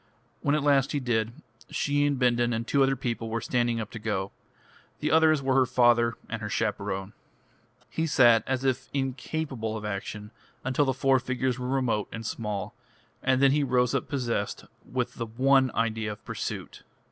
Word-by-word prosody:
When 145 0 +2
at 150 - 0
last 140 -1 +3
he 145 - +1
did, 115 -3 0 0.4
she 145 0 +1
and 145 -1 0
Bindon 120 -1 +2
and 115 +1 -2
two 140 +2 +2
other 135 0 +4
people 120 -3 -3
were 115 +1 -1
standing 120 0 0
up 110 -1 -5
to 110 - -7
go. 105 -3 -2 0.7
The 150 - -1
others 155 -2 +4
were 135 0 +2
her 130 -1 +4
father 120 -2 +4
and 115 0 -5
her 105 - -4
chaperone. 100 -3 -2 0.7
He 160 0 -2
sat 120 -6 +5
as 130 0 -1
if 130 0 0
incapable 135 -3 -2
of 105 - -7
action 105 +1 -5 0.3
until 135 +3 +1
the 130 -2 0
four 135 0 +3
figures 130 0 -1
were 125 - -3
remote 125 -6 0
and 115 -1 -6
small, 105 -3 -4 0.5
and 130 0 +2
then 135 - +6
he 145 +1 +2
rose 125 -2 +2
up - - -1
possessed 120 -7 -2 0.3
with 125 -1 -2
the 115 - -3
one 130 +3 +3
idea 110 -2 0
of 105 - -16
pursuit. - - -5
125 Hz, 180 wpm, -27 LUFS, 115-135 Hz, 0.7 s, then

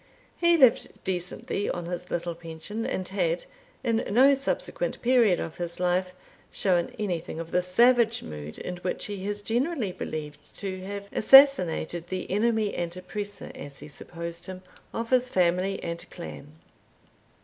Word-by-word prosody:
He 340 -1 +4
lived 260 -6 +3
decently 190 +2 -2
on 175 -1 -3
his 180 +1 -5
little 170 0 -2
pension, 165 +6 -6
and 185 -1 -2
had, - - 0 0.4
in 230 -2 +1
no 260 +6 +6
subsequent - - -2
period 235 -7 +4
of 165 - -5
his 170 -1 -3
life, 180 0 0 0.4
shown 180 -3 +1
anything 175 -6 -3
of 165 0 -6
the 180 - +3
savage 235 +5 +4
mood 75 0 -8
in 180 - -5
which 180 +1 -2
he 200 -1 -5
is 205 0 -3
generally 240 - 0
believed 150 -4 -7
to 190 -2 -5
have 200 0 -6
assassinated 185 - +6
the 185 0 -4
enemy 220 0 +1
and 175 0 -3
oppressor, 205 +2 -6
as 140 -1 -8
he - - -8
supposed 170 +3 -7
him, 185 0 -8 0.3
of 230 +1 -4
his 255 0 +3
family 185 +1 +2
and 170 +1 -5
clan. 150 -4 -9
185 Hz, 150 wpm, -27 LUFS, 175-230 Hz, 0.4 s, no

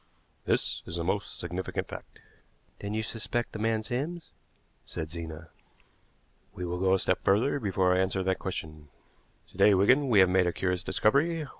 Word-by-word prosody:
This - - +1
is 85 - -4
a 85 - -2
most 100 +4 -2
significant 90 +2 -4
fact." - - -10 0.6
"Then 100 +1 -4
you 110 - -1
suspect 120 +2 -2
the 110 - -7
man 110 0 0
Sims," 145 +9 -4 0.5
said 80 -1 -6
Zena. 80 -1 -7 1.1
"We 90 - -4
will 90 +1 -3
go 95 0 +3
a - - +2
step - - +1
further 110 +9 +2
before 95 -4 +2
I 90 - +2
answer 95 0 0
that 95 0 0
question. 75 -5 -6 0.6
To - - -16
day, 105 - +6
Wigan, 130 +9 +4
we 110 - +4
have 95 -1 +7
made 90 -1 +3
a 85 - 0
curious 90 -1 -1
discovery. 150 +10 +1
95 Hz, 175 wpm, -29 LUFS, 90-110 Hz, 1.1 s, have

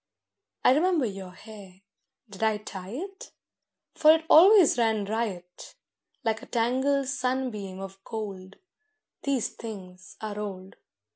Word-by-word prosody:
I - - +7
remember 325 -1 +2
your 195 -3 -6
hair—did 200 +2 -15
I 220 -1 +2
tie 190 -3 -9
it? 380 - -8 0.6
For 310 - +6
it 320 0 +2
always 360 - +7
ran 220 -3 +1
riot— 195 -5 -5 0.5
Like 225 -1 -1
a - - -12
tangled 260 +4 +1
sunbeam 250 -8 -2
of 195 0 -9
gold: 195 -4 -7 0.7
These 275 -5 0
things 185 -5 -10
are 210 -1 -5
old. 190 -2 -7
220 Hz, 120 wpm, -27 LUFS, 195-265 Hz, 0.7 s, I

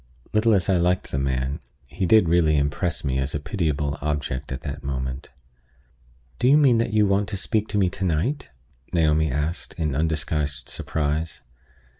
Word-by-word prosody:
Little 110 0 +4
as 90 -3 +1
I 95 - +3
liked 90 +1 0
the 70 - -1
man, 65 +1 -1 0.3
he 95 - -3
did 110 -1 +5
really 80 -2 +3
impress 75 +5 0
me 65 -2 0
as 65 +2 -2
a - - -1
pitiable 75 -4 -2
object 75 -2 -3
at 65 +1 -4
that 70 -1 -6
moment. 65 -1 -4 1.1
"Do 125 - +2
you 140 +3 +7
mean 130 -6 +5
that 115 - 0
you 105 -1 +4
want 100 0 +1
to 100 - -3
speak 110 +2 0
to 105 - -2
me 95 -2 +3
to 95 - -5
night?" 90 - -1 0.4
Naomi 80 -2 +3
asked, 75 +6 -3
in 75 -4 -1
undisguised 75 -2 -1
surprise. 80 +1 -3
80 Hz, 175 wpm, -24 LUFS, 70-95 Hz, 1.1 s, you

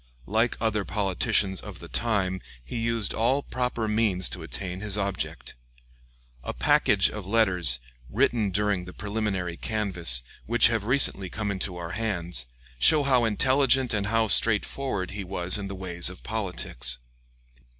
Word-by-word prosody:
Like 110 +4 0
other 110 -2 0
politicians 95 0 0
of - - -9
the - - -11
time, 95 -5 -1 0.2
he 120 - -6
used 115 -2 0
all 130 +5 +1
proper 125 -3 -2
means 105 -4 +1
to - - -6
attain 90 -1 -6
his 105 -1 -1
object. 95 -11 -4 0.9
A - - -5
package - - +3
of 105 -3 -7
letters, 90 - +4 0.3
written 115 -3 +1
during 100 -1 -1
the 90 - -9
preliminary 100 -5 -3
canvass, 90 - -1 0.2
which 115 0 +4
have 115 -3 -1
recently 115 -7 +4
come 105 0 -3
into 95 -2 -3
our 85 -1 -6
hands, 90 - -1 0.3
show 150 - +5
how 130 -4 +3
intelligent 130 +3 +3
and 100 -1 -1
how 115 +1 +1
straightforward 105 0 +1
he 105 0 -5
was 90 +1 0
in 100 - -5
the 100 - -6
ways 90 -2 +2
of 90 - -12
politics. 85 - -2
100 Hz, 150 wpm, -26 LUFS, 90-115 Hz, 0.9 s, show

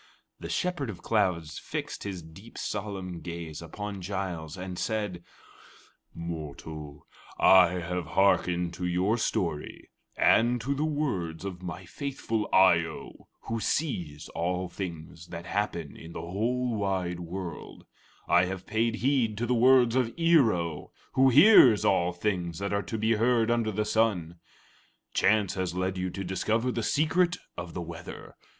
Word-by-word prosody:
'" - - -52
The - - -7
Shepherd 175 -8 -1
of 100 - -8
Clouds 90 -8 0
fixed - - -5
his 95 -4 -5
deep, 90 +8 -13
solemn 95 -4 -4
gaze 85 -2 -7
upon 100 +4 -6
Giles 90 -4 -4
and 90 -1 -6
said: 105 -6 -2 0.9
"Mortal, 75 -2 -7 0.3
I 90 -2 +6
have 90 -1 -3
hearkened 90 -3 +3
to 90 +1 -3
your 95 +6 +1
story 80 -8 -2 0.3
and 120 +2 +4
to 135 +4 -1
the 145 +3 -1
words 100 - -2
of 90 -2 -6
my 90 +1 -6
faithful 115 -1 -3
Eye 95 -3 +6
o, 80 -1 -9
who 115 0 -3
sees 90 - -2
all 90 +2 -2
things 85 -2 -7
that 85 0 -8
happen 85 -7 -2
in 80 +1 -11
the - - -5
whole 115 +7 -1
wide 95 -3 -1
world; 90 -1 -7 0.4
I 90 +1 +5
have 95 0 -5
paid 115 +1 0
heed 120 -4 +1
to 120 - -1
the 125 - +1
words 125 0 +5
of 125 -3 +2
Ear 165 -8 +5
o, 85 -4 -4 0.2
who 130 0 +5
hears 130 - +7
all 90 -2 +3
things 90 -2 -2
that 100 +2 -3
are 100 - +1
to 110 - -5
be 110 +1 +2
heard 115 0 +3
under 115 -2 +1
the 105 +1 -1
sun. 90 -8 0 0.7
Chance 105 -2 +3
has 90 -2 -3
led 95 +1 -1
you 90 0 -2
to 95 +2 -5
discover 110 +7 0
the 120 - -2
secret 165 +7 +2 0.2
of 85 -1 -7
the 90 - -3
weather. 85 +1 -9
95 Hz, 155 wpm, -28 LUFS, 85-115 Hz, 0.9 s, hears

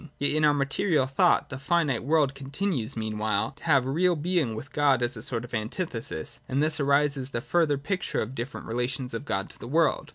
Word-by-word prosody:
Yet 145 - +1
in 155 +1 +1
our 150 - +5
material 140 +2 +1
thought, 135 +1 +3
the 130 - -6
finite 145 -5 +1
world 145 -1 +2
continues, 135 - -2
meanwhile, 110 -2 -1
to 140 - -17
have 140 -6 +4
a 135 - -2
real 175 +4 +3
being, 155 -7 0
with 135 +5 -8
God 140 -4 +3
as 120 - +1
a - - -7
sort 120 -1 -2
of 120 - -14
antithesis: 115 - -3
and 130 - 0
thus 155 +1 +2
arises 140 -1 +2
the 120 - -2
further 160 0 +2
picture 185 +7 -2
of 110 +4 -7
different 125 +1 -6
relations 125 +2 -2
of 115 +5 -4
God 95 -7 -1
to - - -14
the - - -8
world. 160 +4 +1
135 Hz, 215 wpm, -27 LUFS, 120-155 Hz, -, our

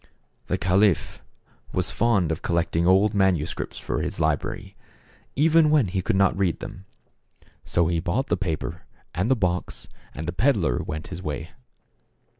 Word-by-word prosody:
The - - 0
caliph 95 -1 +2 0.5
was - - 0
fond 100 -8 +2
of 80 - -3
collecting 85 0 0
old 95 +3 +4
manu 95 -6 +2
scripts - - -6
for - - -3
his - - -4
library, - - -1 0.6
even 155 +2 +4
when 145 -10 +3
he 95 +1 -1
could 90 - 0
not 95 -1 +3
read 95 -3 0
them, 95 -2 -9 0.8
so 85 - +1
he 85 0 0
bought 95 +11 -1
the - - 0
paper 85 -1 -3 0.3
and 95 +7 -1
the 130 - +4
box, 90 -5 -2 0.3
and 80 +3 -5
the 85 - -2
peddler 90 - +2
went 80 +1 -6
his 90 -1 -6
way. 80 -1 -5
90 Hz, 160 wpm, -24 LUFS, 85-105 Hz, 0.8 s, old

